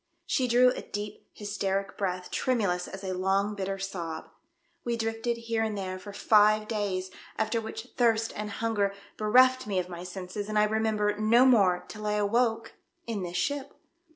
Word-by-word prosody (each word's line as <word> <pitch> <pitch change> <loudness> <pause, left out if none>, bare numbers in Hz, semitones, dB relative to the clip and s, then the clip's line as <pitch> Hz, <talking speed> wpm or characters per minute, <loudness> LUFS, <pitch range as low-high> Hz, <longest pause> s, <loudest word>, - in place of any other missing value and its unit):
She 255 -2 +1
drew 250 +1 +5
a - - -5
deep 205 0 -7
hysteric 200 -1 -2
breath, 185 -2 -3
tremulous 200 -8 0
as 195 +1 -8
a 190 -1 -2
long 195 +3 +1
bitter 195 -1 -3
sob. 170 -4 -5 0.3
" 340 0 -43
We 235 -1 -1
drifted 225 +1 -1
here 230 -1 -2
and 220 -2 -1
there 185 -1 -4
for 205 +2 -9
five 215 +1 +4
days, 195 -4 -2 0.3
after 225 +1 0
which 225 +2 -7
thirst 230 -2 +2
and 210 0 -4
hunger 205 -2 -1 0.2
bereft 255 +4 +4
me 200 -2 -1
of 180 0 -1
my 175 0 -7
senses, 185 +3 -6
and 215 - -1
I 210 - +5
remember 210 -1 +1
no 230 +4 +5
more 195 -8 +4
till 210 0 -6
I 210 - +1
awoke 225 +2 +1 0.3
in 225 -4 -3
this 175 -1 -4
ship. 280 +9 -2
210 Hz, 180 wpm, -28 LUFS, 195-225 Hz, 0.3 s, drew